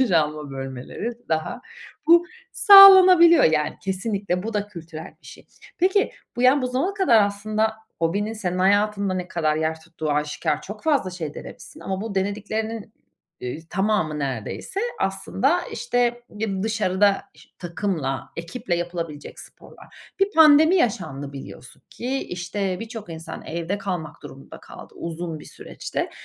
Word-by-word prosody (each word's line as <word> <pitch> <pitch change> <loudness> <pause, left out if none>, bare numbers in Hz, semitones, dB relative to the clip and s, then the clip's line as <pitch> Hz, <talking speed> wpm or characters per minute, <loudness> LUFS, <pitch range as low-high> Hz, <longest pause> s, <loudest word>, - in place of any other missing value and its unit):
duş 255 -6 +2
alma 150 -3 0
bölmeleri 135 - -6 0.2
daha 160 +10 -2 0.5
bu 340 +1 +6 0.3
sağlanabiliyor 375 -4 +9
yani 155 -1 +1
kesinlikle. 195 -1 -2
Bu 220 +1 -5
da 205 0 -1
kültürel 165 -4 -10
bir - - -16
şey. - - -13 0.3
Peki 385 +3 +2 0.2
bu 245 - -1
yani 255 +2 +5
bu - - 0
zamana 270 +11 -1
kadar 245 - +4
aslında 215 +2 -1 0.3
hobinin 200 +6 -1
senin 185 -5 -3
hayatında 200 0 +2
ne 180 -1 -4
kadar 155 -4 0
yer 160 0 -2
tuttuğu 160 -1 -5
aşikâr 150 +1 -1
çok 210 +2 -9
fazla 285 -12 +1
şey 165 -5 -6
denemişsin - - -11
ama 190 0 -4
bu 220 -2 -5
denediklerinin, 215 +3 -3 0.5
eee, 125 +4 -5
tamamı 190 -6 0
neredeyse 135 - -4 0.2
aslında 255 - 0
işte 240 0 -1
bir 210 -3 -3
dışarıda 205 -2 +1
ş - - -19
takımla, 170 -6 -3
ekiple 175 +4 -4
yapılabilecek 170 -4 -6
sporlar. - - -16
Bir 390 +1 +3
pandemi 315 +1 +6
yaşandı 155 - -1
biliyorsun 135 -2 -11
ki 260 +3 -3
işte 185 +2 -3
birçok 225 -2 -8
insan 160 0 -8
evde 170 +4 -3
kalmak 175 -6 -5
durumunda 135 - -12
kaldı - - -13
uzun 165 -1 -5
bir - - -12
süreçte. - - -6
195 Hz, 140 wpm, -23 LUFS, 160-230 Hz, 0.5 s, sağlanabiliyor